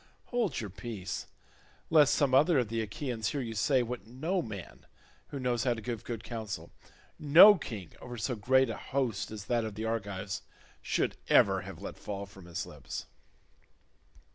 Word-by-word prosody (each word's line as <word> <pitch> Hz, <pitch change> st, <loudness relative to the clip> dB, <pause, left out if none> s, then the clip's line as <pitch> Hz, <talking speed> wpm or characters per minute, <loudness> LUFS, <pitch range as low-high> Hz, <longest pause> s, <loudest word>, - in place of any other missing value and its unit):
Hold 230 Hz, -, 0 dB
your 105 Hz, -4 st, -5 dB
peace, 100 Hz, -2 st, -5 dB, 0.6 s
lest 150 Hz, -3 st, +6 dB
some 140 Hz, -3 st, +2 dB
other 150 Hz, +4 st, +5 dB
of 120 Hz, -4 st, +1 dB
the 115 Hz, 0 st, -1 dB
Achaeans 110 Hz, +1 st, -3 dB
hear 145 Hz, -, -1 dB
you 115 Hz, -4 st, -3 dB
say 130 Hz, +4 st, +2 dB
what 120 Hz, -1 st, -6 dB
no 160 Hz, +10 st, -1 dB
man 105 Hz, -, -8 dB, 0.4 s
who 140 Hz, -, -6 dB
knows 125 Hz, -2 st, 0 dB
how 125 Hz, -2 st, +2 dB
to 110 Hz, -, -7 dB
give 120 Hz, -2 st, -4 dB
good 115 Hz, -2 st, -5 dB
counsel, 110 Hz, -4 st, -5 dB, 0.5 s
no 160 Hz, +8 st, +9 dB
king 105 Hz, -, -7 dB
over 120 Hz, -1 st, -7 dB
so 125 Hz, +3 st, -1 dB
great 130 Hz, +3 st, +3 dB
a 110 Hz, -, -5 dB
host 125 Hz, -7 st, -2 dB
as 105 Hz, -2 st, -7 dB
that 120 Hz, 0 st, +1 dB
of 110 Hz, -2 st, -5 dB
the 110 Hz, +1 st, -3 dB
Argives 100 Hz, -4 st, -3 dB, 0.4 s
should -, -, 0 dB
ever -, -, +5 dB
have -, -, -9 dB
let -, -, -6 dB
fall 100 Hz, -1 st, -5 dB
from 95 Hz, -2 st, -14 dB
his 85 Hz, -, -4 dB
lips. -, -, -7 dB
115 Hz, 175 wpm, -31 LUFS, 105-130 Hz, 0.6 s, no